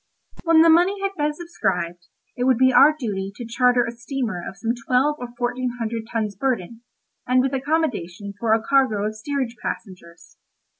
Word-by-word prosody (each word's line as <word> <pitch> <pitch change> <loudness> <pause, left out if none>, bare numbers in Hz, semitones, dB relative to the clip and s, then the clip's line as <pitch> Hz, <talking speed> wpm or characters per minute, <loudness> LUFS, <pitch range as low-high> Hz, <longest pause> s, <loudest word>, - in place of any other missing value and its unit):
When 330 -1 +6
the 330 - +5
money 360 +5 +3
had 395 - 0
been 300 -2 0
subscribed, 175 - -3 0.3
it 250 - -1
would 260 -2 +4
be 260 +1 +4
our 300 +4 +7
duty 200 -7 -3
to 240 - -7
charter 245 +1 +2
a 235 - -4
steamer 235 -5 -4
of 190 - -8
some 225 +4 -1
twelve 275 +4 +2
or 245 - -5
fourteen 245 0 -2
hundred 225 -1 -4
tons 215 -3 -2
burden, 230 -2 -2 0.5
and 255 +1 +3
with 265 +1 +1
accommodation 255 - -2
for 230 0 0
a 225 - -2
cargo 240 -6 +2
of 215 - -2
steerage 255 +1 -3
passengers. 175 -4 -8
245 Hz, 180 wpm, -22 LUFS, 215-275 Hz, 0.5 s, our